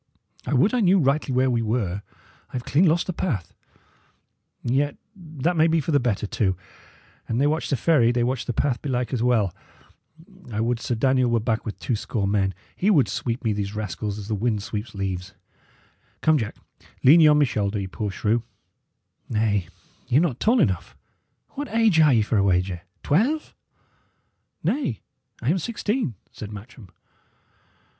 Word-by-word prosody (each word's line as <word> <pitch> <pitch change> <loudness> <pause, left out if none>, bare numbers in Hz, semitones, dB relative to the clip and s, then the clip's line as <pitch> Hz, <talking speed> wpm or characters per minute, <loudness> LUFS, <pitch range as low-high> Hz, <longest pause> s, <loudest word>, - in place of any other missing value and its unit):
I 145 - +1
would 190 - +3
I 250 - +2
knew 195 -2 +4
rightly 140 -3 +1
where 130 +1 +2
we 120 -1 +1
were. 105 -4 -1 0.5
I - - -26
have 125 -1 -4
clean 160 +7 +3
lost 165 +2 +2
the 185 - -3
path; 125 - -3 1.1
yet 140 +4 0 0.2
that 165 -2 -2
may 160 0 +4
be 165 0 +2
for 160 - -2
the 145 - +4
better, 115 -5 -1
too. 95 -3 0 0.7
An 115 - -1
they 140 - +3
watch 155 +2 0
the 140 - +1
ferry, 120 -3 +4
they 120 -1 +1
watch 125 0 -2
the - - 0
path, 125 0 0
belike, 125 -3 -2
as 120 - 0
well. 115 -7 +2 1.0
I 105 - -3
would 115 +1 0
Sir 120 - -2
Daniel 130 +1 +2
were 120 0 +2
back 110 0 -1
with 105 - -5
two 125 - -1
score 105 -1 -2
men; 95 -1 +1 0.2
he 195 - +1
would 155 -11 +4
sweep 120 +1 -3
me 110 -2 +1
these 100 0 -3
rascals 105 0 -4
as 100 -2 -7
the 110 - -2
wind 105 -1 -1
sweeps 105 +1 -5
leaves. 95 0 -4 0.9
Come, 155 -1 +4
Jack, 110 -3 -4 0.5
lean 150 +6 +8
ye 160 - +7
on 150 0 +6
my 150 - +5
shoulder, 105 -4 -1
ye 95 - -3
poor 105 +3 -4
shrew. 110 +4 0 0.9
Nay, 105 -5 +1 0.4
y' 125 - +3
are - - +7
not 155 -8 0
tall 235 +3 +3
enough. 95 - 0 0.5
What 290 +1 -5
age 220 -6 +3
are 155 -2 +6
ye, 115 -4 +4
for 110 - 0
a - - +3
wager? 90 -2 +1 0.2
twelve?" 250 - +1 1.1
"Nay, 195 - -1 0.4
I 130 - +2
am 185 - +1
sixteen," 215 - -2 0.2
said 105 -1 -8
Matcham. 105 0 -11
120 Hz, 180 wpm, -24 LUFS, 105-155 Hz, 1.1 s, lean